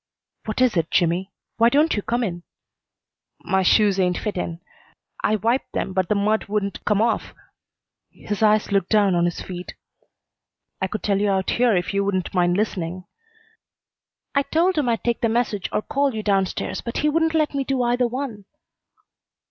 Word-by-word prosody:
"What 215 Hz, +3 st, -2 dB
is 255 Hz, -5 st, +3 dB
it, 165 Hz, -2 st, 0 dB
Jimmy? 175 Hz, +2 st, +1 dB, 0.3 s
Why 230 Hz, 0 st, +5 dB
don't 300 Hz, +5 st, +3 dB
you 205 Hz, -, -1 dB
come 240 Hz, +4 st, -1 dB
in?" 175 Hz, -5 st, -3 dB, 1.0 s
"My 190 Hz, 0 st, +1 dB
shoes 200 Hz, +1 st, +4 dB
ain't 180 Hz, -1 st, +1 dB
fitten. 180 Hz, -5 st, -4 dB, 0.6 s
I 215 Hz, -, +2 dB
wiped 230 Hz, +5 st, -1 dB
them, 190 Hz, -, -2 dB
but 185 Hz, -1 st, 0 dB
the 210 Hz, -, +2 dB
mud 210 Hz, +2 st, +1 dB
wouldn't 200 Hz, -1 st, -3 dB
come 210 Hz, +1 st, +2 dB
off." 230 Hz, -, -1 dB, 0.7 s
His 210 Hz, 0 st, -6 dB
eyes 215 Hz, -1 st, +3 dB
looked 195 Hz, -3 st, +1 dB
down 205 Hz, -3 st, +3 dB
on 175 Hz, 0 st, +2 dB
his 175 Hz, -, -2 dB
feet. 180 Hz, -1 st, -7 dB, 1.1 s
"I 190 Hz, -, +1 dB
could 215 Hz, -, -5 dB
tell 200 Hz, -2 st, +1 dB
you 205 Hz, -, +2 dB
out 190 Hz, -1 st, 0 dB
here 240 Hz, -3 st, +3 dB
if 180 Hz, +2 st, -1 dB
you 200 Hz, 0 st, +1 dB
wouldn't 185 Hz, -3 st, -2 dB
mind 175 Hz, -1 st, +2 dB
listening." 185 Hz, -4 st, -2 dB, 1.3 s
"I 280 Hz, -, +3 dB
told 340 Hz, +6 st, +1 dB
him 265 Hz, -5 st, 0 dB
I'd 230 Hz, -2 st, -1 dB
take 235 Hz, -1 st, -1 dB
the 230 Hz, -, +2 dB
message 225 Hz, -4 st, -1 dB
or 215 Hz, -, -1 dB
call 280 Hz, -3 st, 0 dB
you 215 Hz, -, -3 dB
down 195 Hz, -2 st, +2 dB
stairs, -, -, -4 dB
but 235 Hz, -, -5 dB
he -, -, +5 dB
wouldn't 320 Hz, +1 st, +1 dB
let 310 Hz, -2 st, +1 dB
me 275 Hz, -1 st, 0 dB
do 265 Hz, -2 st, 0 dB
either 245 Hz, +1 st, +2 dB
one." 235 Hz, -5 st, -5 dB
210 Hz, 185 wpm, -22 LUFS, 190-240 Hz, 1.3 s, Why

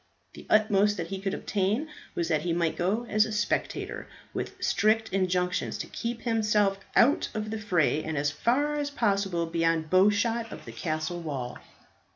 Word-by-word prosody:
The -, -, -12 dB
utmost 210 Hz, -1 st, +4 dB
that 170 Hz, -2 st, -4 dB
he 195 Hz, -1 st, -4 dB
could 195 Hz, -1 st, -1 dB
obtain 210 Hz, +9 st, -1 dB, 0.3 s
was 170 Hz, -, 0 dB
that 155 Hz, -3 st, +1 dB
he 175 Hz, 0 st, -1 dB
might 170 Hz, -1 st, 0 dB
go 200 Hz, +7 st, 0 dB
as 215 Hz, -2 st, +3 dB
a 220 Hz, -, -4 dB
spectator, 210 Hz, -1 st, -2 dB, 0.3 s
with -, -, -4 dB
strict 220 Hz, 0 st, +2 dB
injunctions 180 Hz, -1 st, 0 dB
to -, -, -4 dB
keep 235 Hz, 0 st, -4 dB
himself 210 Hz, -4 st, +2 dB, 0.2 s
out 270 Hz, +5 st, +4 dB
of 215 Hz, 0 st, -3 dB
the 220 Hz, -, -3 dB
fray, 175 Hz, -7 st, +1 dB
and 160 Hz, -1 st, -3 dB
as 145 Hz, +1 st, +1 dB
far 285 Hz, -, +1 dB
as 290 Hz, -1 st, -1 dB
possible 195 Hz, -9 st, 0 dB
beyond 165 Hz, -1 st, 0 dB
bow 185 Hz, +2 st, +6 dB
shot 225 Hz, +2 st, 0 dB
of -, -, -9 dB
the -, -, -8 dB
castle 160 Hz, +1 st, -3 dB
wall. 130 Hz, -6 st, -5 dB
195 Hz, 180 wpm, -28 LUFS, 170-220 Hz, 0.3 s, bow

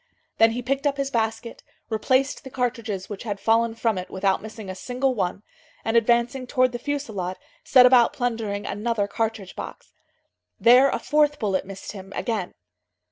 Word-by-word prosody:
Then 225 Hz, 0 st, +6 dB
he 245 Hz, +1 st, -4 dB
picked 275 Hz, +3 st, 0 dB
up 280 Hz, -1 st, -1 dB
his 275 Hz, 0 st, -2 dB
basket, 225 Hz, 0 st, -2 dB, 0.3 s
replaced 260 Hz, +5 st, 0 dB
the 265 Hz, -, -8 dB
cartridges 230 Hz, -7 st, -3 dB
which 205 Hz, -2 st, -7 dB
had 205 Hz, -3 st, -4 dB
fallen 225 Hz, +2 st, +2 dB
from 225 Hz, -4 st, 0 dB
it, 180 Hz, -, -7 dB
without 190 Hz, 0 st, 0 dB
missing 220 Hz, -1 st, -9 dB
a 185 Hz, -, -4 dB
single 255 Hz, +7 st, -1 dB
one, 195 Hz, -2 st, -2 dB, 0.4 s
and, 225 Hz, -, 0 dB
advancing 235 Hz, +2 st, +2 dB
towards 255 Hz, -1 st, +2 dB
the 240 Hz, -, -5 dB
fusillade, 220 Hz, -10 st, -3 dB, 0.3 s
set 255 Hz, -2 st, +7 dB
about 250 Hz, -2 st, +6 dB
plundering 225 Hz, -5 st, -2 dB
another 210 Hz, 0 st, -1 dB
cartridge 220 Hz, -2 st, -3 dB
box. -, -, -9 dB, 0.7 s
There 250 Hz, +4 st, +7 dB
a -, -, -1 dB
fourth 295 Hz, -1 st, +2 dB
bullet 195 Hz, -6 st, -1 dB
missed 195 Hz, 0 st, -8 dB
him, 195 Hz, -2 st, -10 dB
again. 215 Hz, -7 st, -3 dB
230 Hz, 170 wpm, -24 LUFS, 205-255 Hz, 0.7 s, set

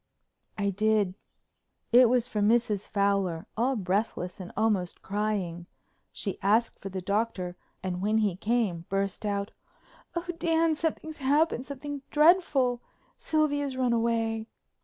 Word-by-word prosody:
I 200 Hz, -1 st, +1 dB
did. 210 Hz, -1 st, +2 dB, 0.8 s
It 245 Hz, 0 st, +7 dB
was 250 Hz, -1 st, +2 dB
from 210 Hz, -4 st, +1 dB
Mrs. 220 Hz, -4 st, +1 dB
Fowler, 200 Hz, -5 st, 0 dB
all 250 Hz, +4 st, +1 dB
breathless 190 Hz, -2 st, -2 dB
and 180 Hz, -2 st, -7 dB
almost 205 Hz, -5 st, 0 dB
crying. 195 Hz, -4 st, -2 dB, 0.4 s
She 200 Hz, -4 st, -5 dB
asked 220 Hz, +4 st, +2 dB
for 195 Hz, -, -6 dB
the 190 Hz, -1 st, -5 dB
Doctor 200 Hz, -3 st, -1 dB, 0.3 s
and 180 Hz, -1 st, -3 dB
when 215 Hz, +2 st, +2 dB
he 210 Hz, -5 st, +1 dB
came 205 Hz, -5 st, 0 dB
burst 195 Hz, +1 st, -1 dB
out: 200 Hz, 0 st, -2 dB, 0.6 s
"Oh, 340 Hz, +1 st, -2 dB
Dan, 330 Hz, -1 st, +2 dB
something's 315 Hz, 0 st, -3 dB
happened—something 285 Hz, 0 st, 0 dB
dreadful. 295 Hz, -6 st, +4 dB, 0.4 s
Sylvia's 290 Hz, -3 st, 0 dB
run 250 Hz, -2 st, +2 dB
away." 225 Hz, -1 st, 0 dB
220 Hz, 125 wpm, -28 LUFS, 195-255 Hz, 0.8 s, It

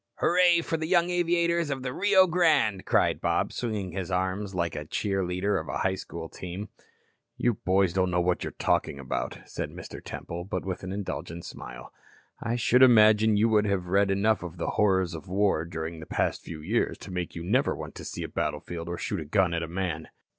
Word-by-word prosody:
"Hurray 175 Hz, -1 st, +4 dB
for 165 Hz, -, -2 dB
the 160 Hz, 0 st, -3 dB
young 175 Hz, 0 st, +3 dB
aviators 170 Hz, -2 st, +1 dB
of 135 Hz, -2 st, -3 dB
the 125 Hz, -1 st, -3 dB
Rio 190 Hz, +1 st, +5 dB
Grande," 155 Hz, -, +2 dB
cried -, -, +2 dB
Bob, -, -, 0 dB
swinging 105 Hz, -6 st, -3 dB
his 95 Hz, 0 st, -4 dB
arm 95 Hz, +2 st, 0 dB
like 90 Hz, -4 st, -2 dB
a 75 Hz, -, -4 dB
cheer 95 Hz, +4 st, -1 dB
leader 90 Hz, +3 st, 0 dB
of -, -, -7 dB
the 95 Hz, 0 st, 0 dB
school 85 Hz, -3 st, -7 dB
team. 95 Hz, +5 st, -7 dB, 0.7 s
"You 120 Hz, -, +2 dB
boys 95 Hz, -2 st, +1 dB
don't 95 Hz, -1 st, +2 dB
know 90 Hz, 0 st, +1 dB
what 90 Hz, 0 st, +1 dB
you're -, -, -3 dB
talking -, -, +1 dB
about," 65 Hz, -2 st, -3 dB
said -, -, -5 dB
Mr. -, -, -9 dB
Temple, 85 Hz, +1 st, -6 dB
but 95 Hz, -1 st, -4 dB
with 95 Hz, -2 st, -3 dB
an 95 Hz, -, -5 dB
indulgent 90 Hz, -4 st, -5 dB
smile. -, -, -9 dB, 0.5 s
"I 120 Hz, 0 st, -1 dB
should 125 Hz, +2 st, +3 dB
imagine 110 Hz, -3 st, +6 dB
you 110 Hz, +2 st, +4 dB
would 105 Hz, -1 st, +3 dB
have 100 Hz, -3 st, 0 dB
read 100 Hz, +1 st, +3 dB
enough 100 Hz, +3 st, +2 dB
of 85 Hz, 0 st, -7 dB
the 85 Hz, -, -2 dB
horrors 95 Hz, -4 st, +2 dB
of 80 Hz, +4 st, -8 dB
war 95 Hz, -3 st, +1 dB
during 80 Hz, 0 st, -5 dB
the 80 Hz, -, -9 dB
past -, -, -1 dB
few 80 Hz, -2 st, -8 dB
years 110 Hz, +9 st, 0 dB
to 95 Hz, -, -10 dB
make 90 Hz, -2 st, -4 dB
you 85 Hz, -, -5 dB
never 120 Hz, +10 st, +2 dB
want -, -, -7 dB
to -, -, -9 dB
see -, -, -5 dB
a -, -, -3 dB
battlefield 85 Hz, -1 st, -3 dB
or 85 Hz, -, -3 dB
shoot 100 Hz, -, -3 dB
a 80 Hz, -, -5 dB
gun 90 Hz, +2 st, +2 dB
at 85 Hz, -, -1 dB
a 85 Hz, -, -3 dB
man." 85 Hz, -2 st, -3 dB
95 Hz, 210 wpm, -27 LUFS, 85-115 Hz, 0.7 s, imagine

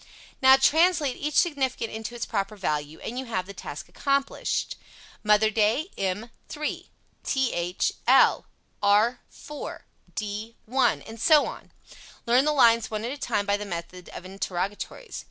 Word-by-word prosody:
Now 265 Hz, 0 st, +8 dB
translate 315 Hz, 0 st, +3 dB
each 295 Hz, 0 st, -3 dB
significant 265 Hz, -8 st, +1 dB
into 220 Hz, +2 st, -6 dB
its 240 Hz, -, -3 dB
proper 205 Hz, -1 st, -2 dB
value 150 Hz, -5 st, -3 dB
and 245 Hz, +3 st, -4 dB
you 265 Hz, -, -5 dB
have 205 Hz, -6 st, -2 dB
the 200 Hz, -, -9 dB
task 150 Hz, -5 st, -8 dB
accomplished. 275 Hz, 0 st, -1 dB, 0.5 s
"Mother 210 Hz, +1 st, +4 dB
Day," 230 Hz, -, +1 dB
m 195 Hz, +5 st, -3 dB, 0.2 s
3, 300 Hz, 0 st, -4 dB, 0.3 s
th 180 Hz, -10 st, 0 dB, 0.2 s
l, -, -, +5 dB, 0.3 s
r 210 Hz, +4 st, +3 dB
4, 295 Hz, -1 st, -8 dB, 0.3 s
d 215 Hz, +2 st, -4 dB
l, 260 Hz, +4 st, -3 dB, 0.3 s
and 225 Hz, 0 st, -10 dB
so 305 Hz, +1 st, +6 dB
on. -, -, -8 dB, 0.5 s
Learn 245 Hz, +4 st, +4 dB
the 300 Hz, -, +3 dB
lines 230 Hz, -5 st, +4 dB
one 215 Hz, 0 st, -3 dB
at 240 Hz, -, -3 dB
a -, -, -4 dB
time 215 Hz, -6 st, -1 dB
by 200 Hz, 0 st, +1 dB
the 210 Hz, -, -5 dB
method 180 Hz, -1 st, -7 dB
of 185 Hz, -, -9 dB
interrogatories. 195 Hz, -, -4 dB
225 Hz, 155 wpm, -26 LUFS, 200-265 Hz, 0.5 s, Now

